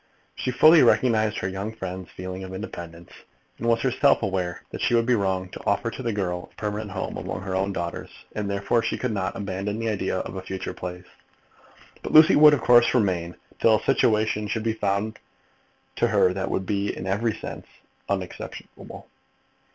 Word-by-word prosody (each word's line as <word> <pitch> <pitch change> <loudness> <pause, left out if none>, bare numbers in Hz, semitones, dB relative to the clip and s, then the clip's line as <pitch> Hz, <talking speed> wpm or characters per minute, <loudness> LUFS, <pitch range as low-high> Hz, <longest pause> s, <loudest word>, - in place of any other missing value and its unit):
She - - -3
fully 155 +6 +7
recognised 110 -5 +3
her 95 - -2
young 100 +4 -4
friend's 95 -3 -6
feeling 95 +1 -7
of 95 0 -7
independence, 85 -4 -8 0.5
and 115 - -3
was 115 -1 +3
herself 135 0 +3
aware 95 -3 -2
that - - -6
she 120 - +2
would 115 0 +3
be 125 - +3
wrong 95 -4 0
to - - -10
offer 110 +3 0
to - - -7
the 120 -2 -1
girl 90 -4 -3
a - - -30
permanent 105 0 -4
home 95 -1 -4
among - - -5
her 95 -1 -5
own 95 +1 0
daughters, 85 -3 -4 0.3
and 105 -2 -2
therefore 100 +4 +1
she - - -2
could 125 - -2
not 100 -3 -2
abandon 100 +1 -3
the 115 0 -2
idea 95 -3 -1
of 95 - -5
a - - -4
future 95 0 -5
place; 90 0 -7 1.0
but - - -6
Lucy 155 0 +8
would, 150 0 +8
of 140 - -5
course, 120 0 +5
remain 90 -7 0 0.2
till 110 -1 +5
a - - -14
situation 105 -1 +2
should 110 +2 -3
have 115 - +1
been 110 - -16
found 100 +2 -1 0.8
for 120 - +3
her 100 -5 +3
that 95 0 -3
would 95 - -2
be 100 +1 -1
in 95 - -6
every 105 +4 0
sense - - -8 0.4
unexceptionable. - - -6
100 Hz, 195 wpm, -25 LUFS, 95-115 Hz, 1.0 s, Lucy